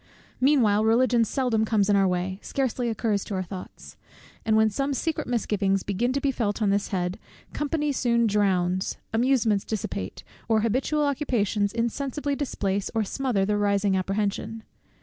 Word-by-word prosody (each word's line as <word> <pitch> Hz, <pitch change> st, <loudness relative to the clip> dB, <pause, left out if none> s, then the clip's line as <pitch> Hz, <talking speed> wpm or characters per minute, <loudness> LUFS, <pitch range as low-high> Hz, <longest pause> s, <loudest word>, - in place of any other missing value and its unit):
Meanwhile 240 Hz, -7 st, +4 dB
Religion 235 Hz, +1 st, +4 dB
seldom 230 Hz, -2 st, 0 dB
comes 215 Hz, -3 st, +2 dB
in 205 Hz, -, +3 dB
our 195 Hz, -1 st, +4 dB
way, 185 Hz, +1 st, -2 dB
scarcely 255 Hz, -3 st, -1 dB
occurs 215 Hz, -2 st, 0 dB
to 200 Hz, -, -4 dB
our 185 Hz, -, -1 dB
thoughts; 185 Hz, 0 st, -10 dB, 0.5 s
and 220 Hz, -1 st, +2 dB
when 220 Hz, 0 st, +4 dB
some 275 Hz, +6 st, -1 dB
secret 320 Hz, +4 st, -2 dB
misgivings 200 Hz, -5 st, 0 dB
begin 215 Hz, +5 st, 0 dB
to 280 Hz, -, 0 dB
be 275 Hz, 0 st, +1 dB
felt 220 Hz, -5 st, -1 dB
on 210 Hz, -3 st, +2 dB
this 200 Hz, 0 st, +1 dB
head, 180 Hz, -1 st, -2 dB, 0.3 s
company 295 Hz, 0 st, -1 dB
soon 235 Hz, -3 st, +2 dB
drowns, 190 Hz, -3 st, +1 dB, 0.2 s
amusements 225 Hz, -4 st, +2 dB
dissipate, 100 Hz, -, -4 dB, 0.3 s
or 220 Hz, -1 st, +3 dB
habitual 260 Hz, +7 st, +1 dB
occupations 230 Hz, -8 st, 0 dB
insensibly 275 Hz, +5 st, -2 dB
displace 200 Hz, -8 st, -2 dB
or 220 Hz, -, +2 dB
smother 225 Hz, -2 st, 0 dB
the 210 Hz, +1 st, +1 dB
rising 200 Hz, -1 st, +2 dB
apprehension. 205 Hz, +3 st, -2 dB
220 Hz, 155 wpm, -26 LUFS, 200-255 Hz, 0.5 s, Meanwhile